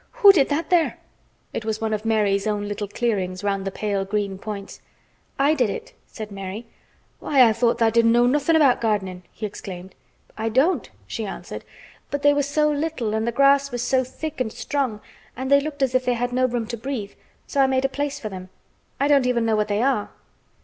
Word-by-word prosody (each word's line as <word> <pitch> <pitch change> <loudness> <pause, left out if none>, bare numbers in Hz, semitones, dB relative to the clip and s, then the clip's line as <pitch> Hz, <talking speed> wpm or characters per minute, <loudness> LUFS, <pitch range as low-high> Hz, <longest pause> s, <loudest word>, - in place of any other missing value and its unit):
"Who 400 - +12
did 305 -8 +3
that 310 +3 -2
there?" 340 -3 +3 0.6
It - - -3
was 220 0 -2
one 220 -1 -1
of 215 +1 -3
Mary's 210 -2 +1
own 205 -1 -1
little 205 0 -4
clearings 195 -4 -2
round 195 -1 -1
the 195 - -2
pale 200 -1 -1
green 200 -1 -2
points. 200 -1 -7 0.6
"I 280 +3 +4
did 250 -8 +1
it," 195 - -6
said 215 -1 -8
Mary. 195 +3 -6 0.5
"Why, 265 -4 +5
I 220 - +3
thought 235 +1 +1
tha' 225 -1 +3
didn't 230 0 +4
know 240 +1 +4
nothin' 290 +5 +2
about 285 -5 +4
gardenin'," 195 -5 -1
he 215 - -6
exclaimed. 190 -2 -8 0.4
"I 225 +1 -2
don't," 270 +11 +2 0.2
she - - -4
answered, - - -7 0.5
"but 285 0 -3
they 290 0 +6
were 290 - +2
so 300 +2 +1
little, 290 -7 -2
and 220 +1 -1
the - - +1
grass 275 +2 +4
was 245 -1 -2
so 260 +1 +2
thick 280 +3 -6
and 220 -3 -1
strong, 255 -7 -2 0.4
and 260 +1 -3
they 280 0 +6
looked 285 -1 -3
as 260 -1 +1
if 255 0 +2
they 245 - +2
had 245 +1 -2
no 255 +1 +3
room 240 -2 -2
to 235 - -4
breathe. 230 -4 -4 0.3
So 280 - 0
I 270 - +5
made 265 0 +1
a - - +5
place 285 +1 -3
for 215 - -5
them. 185 -1 -8 0.5
I 280 - +2
don't 280 -3 +4
even 240 -2 +1
know 225 -1 +2
what 210 0 +1
they 210 +2 0
are." 260 -6 +1
235 Hz, 220 wpm, -23 LUFS, 210-275 Hz, 0.6 s, Who